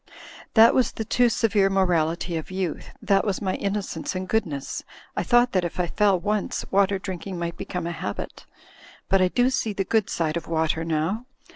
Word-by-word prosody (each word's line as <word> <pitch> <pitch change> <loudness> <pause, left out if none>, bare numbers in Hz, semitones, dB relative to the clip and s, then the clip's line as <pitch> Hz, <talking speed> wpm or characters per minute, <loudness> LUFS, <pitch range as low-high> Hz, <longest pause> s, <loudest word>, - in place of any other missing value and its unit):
That 225 0 +8
was 255 - +2
the 220 - -4
too 240 +2 +3
severe 210 -3 +2
morality 175 -3 +1
of 160 - -4
youth; 185 -3 -3
that 195 -1 +3
was 200 -3 -1
my 190 -2 -1
inno 200 +1 -1
cence 165 +1 -5
and 185 0 -3
goodness. 160 -12 -2 0.3
I - - 0
thought 240 0 +4
that 185 -2 +1
if 175 +1 -4
I 180 - +2
feU 200 +3 +2
once, 205 +3 -1
water 200 0 +3
drinking 190 -1 -6
might 170 0 -3
become 180 -2 -4
a 170 - -2
habit. 100 -11 -6 0.6
But 195 0 +4
I 185 - +5
do 245 +7 +2
see 225 -4 -1
the 195 - -1
good 220 -1 +1
side 165 -1 -1
of 170 - -6
water 160 0 0
now. 165 +9 -1
190 Hz, 195 wpm, -25 LUFS, 170-210 Hz, 0.6 s, That